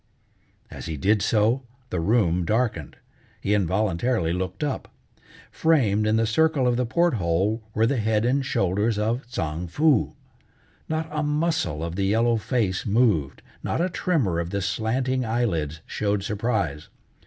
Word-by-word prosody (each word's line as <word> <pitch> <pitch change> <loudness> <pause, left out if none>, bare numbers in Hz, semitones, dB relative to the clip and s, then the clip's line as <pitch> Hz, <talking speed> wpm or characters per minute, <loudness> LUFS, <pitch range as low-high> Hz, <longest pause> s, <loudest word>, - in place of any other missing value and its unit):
As - - -8
he 80 -2 -4
did 105 +8 +2
so 110 +5 +2 0.3
the 90 - -1
room 90 -2 +2
darkened. 105 - -1 0.4
He 100 - 0
involuntarily 100 -1 +1
looked 95 +5 -3
up. 145 -3 -2 0.6
Framed 110 -10 +2
in 110 - +3
the 115 0 +2
circle 145 +3 +2
of 120 - +2
the 125 0 0
port 170 +7 +2
hole 95 +3 0
were 110 - +3
the 130 +3 +1
head 110 0 +1
and 135 +3 +2
shoulders 105 -1 0
of 115 +4 0
Tsang 80 -7 -3
Foo. 145 - +2 0.7
Not 160 0 -1
a 150 0 -1
muscle 150 - 0
of 85 0 -4
the 100 - +1
yellow 115 +3 +2
face 110 -5 -1
moved, 100 - +1 0.2
not - - -2
a 180 +2 +1
tremor 140 - 0
of 85 0 -3
the 100 0 -2
slanting 125 +7 -1
eyelids 85 -10 -1
showed 100 -1 -1
surprise. 100 - -2
110 Hz, 155 wpm, -24 LUFS, 95-125 Hz, 0.7 s, in